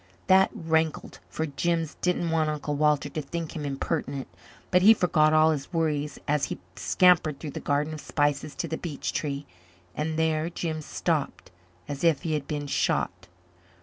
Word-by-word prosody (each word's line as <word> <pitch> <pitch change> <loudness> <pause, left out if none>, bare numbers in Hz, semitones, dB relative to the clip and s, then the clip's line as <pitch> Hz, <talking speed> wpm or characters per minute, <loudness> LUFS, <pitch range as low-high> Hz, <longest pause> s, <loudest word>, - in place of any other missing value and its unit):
That 190 +1 +5
rankled, 160 -1 -1
for 160 - -2
Jims 165 +2 -1
didn't 175 -2 0
want 160 -1 +2
Uncle 150 -1 -3
Walter 150 -1 +2
to 155 - -4
think 165 +3 -5
him 155 - -4
impertinent. 140 -1 -3 0.4
But 180 -1 +5
he 220 +4 +8
forgot 155 -5 +3
all 155 0 +5
his 145 -1 -4
worries 150 -4 -1
as 145 -1 +2
he - - -5 0.2
scampered 175 -5 +3
through 150 - -6
the - - -5
Garden 145 +2 0
of 155 - -7
Spices 145 0 0
to - - -3
the 160 - -4
beech 155 -5 -4
tree. 140 -1 -3 0.5
And 155 +1 -2
there 160 0 +1
Jims 160 -3 -4
stopped - - -2 0.4
as 145 0 -5
if 165 -5 +3
he 160 - -1
had 150 -2 -2
been 145 -2 -3
shot. 140 - -1
155 Hz, 175 wpm, -27 LUFS, 145-165 Hz, 0.5 s, he